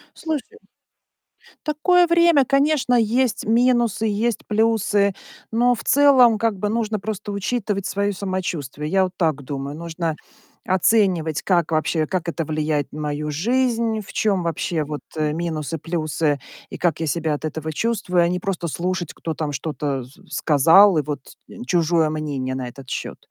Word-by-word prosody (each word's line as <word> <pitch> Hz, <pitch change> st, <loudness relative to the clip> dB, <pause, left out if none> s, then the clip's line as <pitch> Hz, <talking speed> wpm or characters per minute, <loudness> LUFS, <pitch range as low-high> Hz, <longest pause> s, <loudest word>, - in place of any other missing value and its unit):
Слушай, 320 Hz, -, -5 dB, 1.0 s
такое 350 Hz, +4 st, +3 dB
время. 340 Hz, -4 st, +5 dB
Конечно, 275 Hz, -2 st, +2 dB
есть 240 Hz, +2 st, +1 dB
минусы, 235 Hz, -1 st, +2 dB
есть 220 Hz, +2 st, -1 dB
плюсы, 210 Hz, -2 st, +2 dB, 0.4 s
но 245 Hz, +2 st, +3 dB
в 230 Hz, -, -9 dB
целом, 265 Hz, -5 st, +5 dB
как 225 Hz, -4 st, 0 dB
бы, 205 Hz, +2 st, -2 dB
нужно 220 Hz, -1 st, -1 dB
просто 210 Hz, 0 st, -5 dB
учитывать 200 Hz, -1 st, -2 dB
своё 200 Hz, +1 st, -1 dB
самочувствие. 175 Hz, -7 st, -4 dB
Я 190 Hz, +1 st, +3 dB
вот 185 Hz, -1 st, -3 dB
так 155 Hz, -6 st, 0 dB
думаю. 140 Hz, +2 st, -5 dB
Нужно 165 Hz, -1 st, -3 dB, 0.5 s
оценивать, 185 Hz, -5 st, +2 dB
как 175 Hz, -4 st, +1 dB
вообще, 155 Hz, 0 st, +1 dB
как 180 Hz, +1 st, -2 dB
это 165 Hz, -1 st, -3 dB
влияет 150 Hz, -1 st, -1 dB
на 150 Hz, -, -8 dB
мою 150 Hz, 0 st, -3 dB
жизнь, 230 Hz, -, 0 dB
в 200 Hz, -, -12 dB
чём 195 Hz, -5 st, +1 dB
вообще 165 Hz, 0 st, -1 dB
вот, 150 Hz, 0 st, -6 dB
э, 155 Hz, -1 st, 0 dB
минусы, 165 Hz, -1 st, -3 dB
плюсы 155 Hz, -2 st, -1 dB, 0.3 s
и -, -, -7 dB
как 170 Hz, -4 st, 0 dB
я 165 Hz, -, -2 dB
себя 160 Hz, 0 st, 0 dB
от 150 Hz, +2 st, -4 dB
этого 160 Hz, 0 st, -4 dB
чувствую, 200 Hz, -3 st, 0 dB
а -, -, +3 dB
не 180 Hz, +1 st, -1 dB
просто 180 Hz, -2 st, -3 dB
слушать, 175 Hz, +1 st, -3 dB
кто 165 Hz, -, -5 dB
там 155 Hz, -2 st, -3 dB
что-то 145 Hz, -3 st, -3 dB
с 125 Hz, +3 st, -17 dB
сказал, 165 Hz, +6 st, +5 dB
и -, -, +2 dB
вот, 145 Hz, 0 st, -4 dB, 0.3 s
э, 240 Hz, -, -9 dB
чужое 165 Hz, -4 st, +2 dB
мнение 145 Hz, -4 st, -3 dB
на 130 Hz, -1 st, -4 dB
этот 130 Hz, +1 st, -11 dB
счёт. -, -, -4 dB
180 Hz, 160 wpm, -22 LUFS, 155-225 Hz, 1.0 s, время